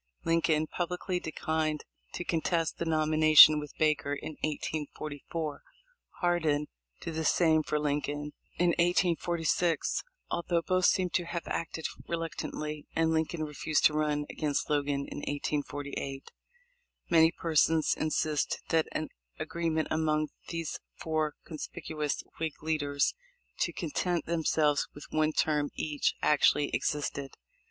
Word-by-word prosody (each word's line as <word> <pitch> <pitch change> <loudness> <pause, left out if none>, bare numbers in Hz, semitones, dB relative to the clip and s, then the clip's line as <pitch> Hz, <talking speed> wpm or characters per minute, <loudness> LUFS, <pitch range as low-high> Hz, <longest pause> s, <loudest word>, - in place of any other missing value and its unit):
Lincoln 165 -2 +2
publicly 180 +2 -2
declined 155 -2 -2 0.3
to - - -3
contest 165 -1 0
the 170 - -1
nomi 155 -1 +1
nation 155 -1 +9
with 150 -1 -9
Baker 150 -2 +1
in 150 - -6
1844; 155 0 -4 0.6
Hardin 160 -4 +2 0.3
did 165 - -5
the 160 0 -2
same 160 -1 +4
for 150 - -1
Lincoln 145 0 -2 0.2
in 175 0 +3
1846 170 -1 +1
— - - -39
although 170 0 0
both 185 +1 +2
seem 180 -2 +2
to 175 - 0
have 170 0 -4
acted 160 -1 -4 0.2
reluctantly; 155 -2 -4
and 160 0 +2
Lin 160 0 +2
coln 165 -2 -4
refused 150 0 0
to 155 - +6
run 150 -1 0
against 150 -1 -2
Logan 145 -1 0
in - - -6
1848. 145 -1 -4 0.8
Many 165 -1 +6
persons 160 -1 +2
in 155 - -1
sist 155 -1 0
that 160 -1 +2
an 155 - -2 0.3
agreement 165 -2 -1
among 155 -1 +1 0.2
these 165 -2 -4 0.2
four 155 -2 -1
conspicuous 155 -1 -4 0.2
Whig 160 -2 -4
leaders 145 -3 +1 0.5
to - - +1
content 180 - -1
themselves 155 -3 +2
with 145 - -9
one 155 0 +2
term 150 -2 +1
each 150 -2 0
actually 150 0 +4
ex - - +1
isted. 140 -2 -4
155 Hz, 130 wpm, -30 LUFS, 150-165 Hz, 0.8 s, nation